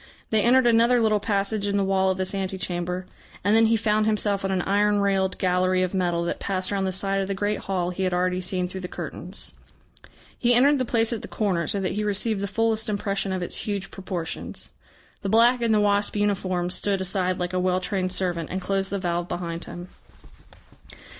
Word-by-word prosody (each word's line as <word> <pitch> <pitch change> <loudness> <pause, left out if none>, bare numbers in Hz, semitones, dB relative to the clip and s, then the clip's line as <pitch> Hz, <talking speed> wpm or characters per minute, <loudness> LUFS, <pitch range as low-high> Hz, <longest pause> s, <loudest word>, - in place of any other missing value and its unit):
They 220 -1 +3
entered 250 +3 +5
another 235 +1 +4
little 215 -2 +3
passage 205 0 0
in 200 0 0
the 200 - +2
wall 190 0 +2
of 190 - 0
this 185 +1 0
ante 190 -1 -2
chamber, 180 0 -2 0.4
and 205 +3 +3
then 225 0 +5
he 225 - +3
found 215 0 +1
himself 205 -2 +1
on 195 - -1
an 185 -2 0
iron 205 +1 +2
railed 195 -1 +1
gallery 185 0 +2
of 185 - -2
metal 175 -2 0
that 170 - -3
passed 185 -1 -1
round 195 -1 0
the - - -1
side 195 +1 0
of 190 - -2
the 195 - -2
great 205 +2 -1
hall 180 -2 -2
he 180 - -5
had 185 -1 +1
already 180 +1 0
seen 180 0 -1
through 185 +1 -6
the 180 - -4
curtains. - - -5 0.8
He 245 0 +4
entered 280 +3 +5
the 255 - 0
place 230 0 +1
at 225 - -4
the - - -7
corner, 180 -7 -1
so 200 - 0
that 185 - -1
he 210 - -2
received 210 0 0
the 200 - -1
fullest 220 +1 0
impression 200 -1 -1
of 185 -1 -2
its - - -2
huge 200 -2 -3
proportions. 180 -4 -5 0.5
The 195 - -3
black 235 +3 +5
in 230 -1 +2
the 215 - +4
wasp 205 0 +1
uniform 185 -4 0
stood 200 +1 0
aside 185 -1 -1
like 180 0 -3
a 185 - +1
well 185 0 +1
trained 185 -1 -1
servant, 175 -4 -1
and 190 - -2
closed 195 +1 -1
the 200 - -2
valve 175 -2 -2
behind 170 -1 -4
him. 175 +1 -8
195 Hz, 220 wpm, -25 LUFS, 185-210 Hz, 0.8 s, entered